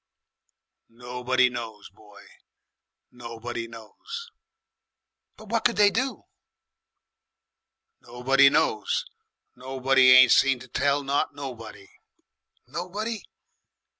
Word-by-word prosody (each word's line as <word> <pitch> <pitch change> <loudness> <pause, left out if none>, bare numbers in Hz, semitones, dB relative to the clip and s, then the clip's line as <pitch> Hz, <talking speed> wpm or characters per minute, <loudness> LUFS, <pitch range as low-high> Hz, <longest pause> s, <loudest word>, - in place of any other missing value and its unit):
"Nobody 125 +2 0
knows, 115 -5 -8
boy, 105 0 -18 0.9
nobody 115 -1 -7
knows." 425 - -10 1.1
"But 215 -1 -14
what 230 0 -1
could 240 - +2
they 205 -1 +4
do?" 255 -1 -3 1.8
"Nobody 135 +3 +3
knows. 110 -5 0 0.5
Nobody 130 0 +2
ain't 130 -1 +8
seen 135 -1 +4
to 125 +1 -13
tell 140 +3 0
not 140 +1 -1
nobody." 115 -8 -9 0.8
"Nobody?" 205 +5 -5
130 Hz, 85 wpm, -25 LUFS, 120-145 Hz, 1.8 s, ain't